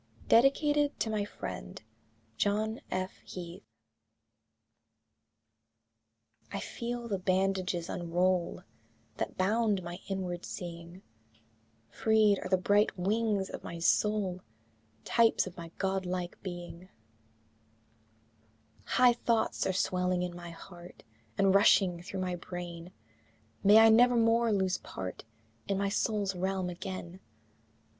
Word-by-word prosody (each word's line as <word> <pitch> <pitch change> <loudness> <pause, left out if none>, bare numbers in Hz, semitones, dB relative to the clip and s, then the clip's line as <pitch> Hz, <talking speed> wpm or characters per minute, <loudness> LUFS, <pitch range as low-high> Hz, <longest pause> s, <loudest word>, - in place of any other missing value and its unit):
DEDICATED 290 +4 +3
TO 220 - -1
MY 210 -2 -1
FRIEND, - - -7 0.5
JOHN 215 - 0
F. 185 0 -3
HEATH. 175 -1 -8 2.9
I. 200 - -3
I - - -3
feel 240 +2 -5
the 200 -4 -2
bandages 185 -2 0
unroll 175 +1 0 0.5
That - - -4
bound 205 0 +1
my 175 +1 -7
inward 185 -2 -3
seeing; 170 0 -8 0.9
Freed 215 -2 +3
are - - -6
the 185 - +4
bright 205 +3 +2
wings 205 +1 0
of - - -7
my 170 - -6
soul, 190 +1 +1 0.6
Types 230 -1 +3
of 185 - -9
my 170 -1 -8
god 190 -1 -1
like 180 -1 -4
being; 175 -1 -8 2.0
High 250 -1 +5
thoughts 235 -1 0
are - - +2
swelling 180 -1 0
in 175 -1 -4
my 175 -1 -8
heart 175 +1 -12 0.3
And 195 -1 +4
rushing 190 -3 +4
through 190 +1 -5
my 180 -1 -2
brain; 175 -1 -7 0.7
May 205 +2 +7
I 225 0 +8
never 245 +2 +6
more 230 0 +3
lose 190 -2 +1
part 95 +2 -7 0.4
In 200 -1 0
my 200 0 0
soul's 205 -1 0
realm 185 0 -1
again! 185 0 -7
190 Hz, 120 wpm, -31 LUFS, 180-210 Hz, 2.9 s, I